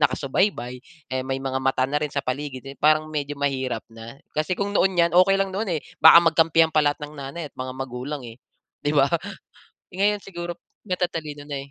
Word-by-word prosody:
nakasubaybay, 145 +3 +1 0.5
eh, 130 0 -2
may 135 0 -2
mga 130 -1 -1
mata 130 -1 +2
na 150 - +1
rin 150 -1 -3
sa 140 - +1
paligid, 130 0 -4
eh, 135 - -9
parang 155 +2 +3
medyo 145 -1 -3
mahirap 130 -4 -1
na. 115 +1 -10 0.2
Kasi 155 +4 0
kung 200 0 -1
noon 190 -1 +3
'yan, 170 0 +4
okey 185 +2 +6
lang 195 0 0
noon, 215 +3 -1
eh. 155 - -1 0.2
Baka 170 - +10
magkampihan 165 0 +4
pa 155 - +1
lahat 145 +2 0
ng 150 +1 -7
nanay 140 +3 -6
at - - -57
mga 130 0 -4
magulang 135 +2 -5
eh, 115 +1 -11 0.5
'di 145 - +1
ba? 140 -2 +5 0.9
Eh, - - -10
ngayon, 205 +1 +3
siguro 175 -2 -6 0.3
matatalino 165 -5 -3
na 145 -1 -4
eh. - - -23
145 Hz, 205 wpm, -24 LUFS, 135-170 Hz, 0.9 s, Baka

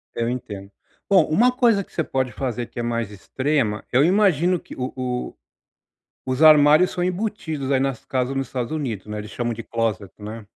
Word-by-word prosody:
Eu 115 0 -1
entendo. 105 -5 -6 0.4
Bom, 190 -5 +5
uma 230 +11 +4
coisa 235 -6 +3
que - - -24
você 160 - 0
pode 130 -3 -1
fazer 120 -3 -3
que 120 - -9
é 120 - -1
mais 115 -3 -2
extrema 120 +1 -1
eu 130 +3 +4
imagino 180 -1 +3
que - - -12
o 125 0 -3
o 125 -1 -3 0.9
os 130 +4 +1
armários 155 +2 +7
são 180 - -3
embutidos 175 -7 -3
aí 135 - +3
nas 135 -2 -2
casas 130 +1 -2
nos 135 -2 -2
Estados 125 +3 -4
Unidos, 120 -10 -4
né. 105 0 -5
Eles 105 0 -8
chamam 120 +2 -2
de 115 +1 -7
closet, 110 -6 -2
né. 105 +1 -8
130 Hz, 190 wpm, -22 LUFS, 115-155 Hz, 0.9 s, armários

